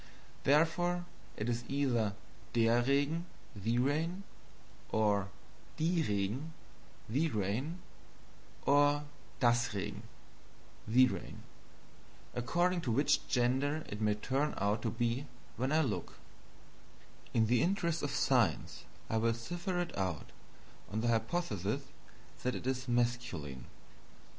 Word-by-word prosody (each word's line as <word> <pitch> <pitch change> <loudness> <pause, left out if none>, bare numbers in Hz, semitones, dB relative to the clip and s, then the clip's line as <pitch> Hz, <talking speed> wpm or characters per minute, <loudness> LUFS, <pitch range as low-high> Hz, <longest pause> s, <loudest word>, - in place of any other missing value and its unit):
Therefore, 175 +4 +3 0.3
it 105 - -2
is 120 0 -1
either 120 -7 +1 0.4
DER 115 +1 +4
(the) 140 - -1
Regen, 160 +9 0 0.7
or 105 -3 +2 0.5
DIE 130 - +1 0.7
(the) 145 +9 +1
Regen, 125 - -2 0.8
or 145 +1 +4 0.4
DAS 120 0 +4
(the) 100 -4 -3 0.9
Regen, 125 +3 +2 0.9
according 175 +9 +1
to 125 - -1
which 145 +4 +2
gender 135 +5 +1
it 105 +1 -5
may 105 -1 +3
turn 135 +7 0
out 100 +3 +1
to 115 - 0
be 120 +4 -1 0.3
when 130 +3 -1
I 155 +1 +4
look. 125 -9 -2 1.2
In 115 -1 +5
the 120 +1 +3
interest 170 -3 +1
of 145 - -1
science, 125 - +1 0.2
I 110 - 0
will 115 +1 +2
cipher 175 +9 -3
it 175 -1 -2
out 90 -6 -2 0.6
on 110 +2 -1
the 120 - +1
hypothesis 115 - 0 0.6
that 125 - 0
it - - -6
is 130 0 -1
masculine. 120 - -1
125 Hz, 110 wpm, -34 LUFS, 110-150 Hz, 1.2 s, In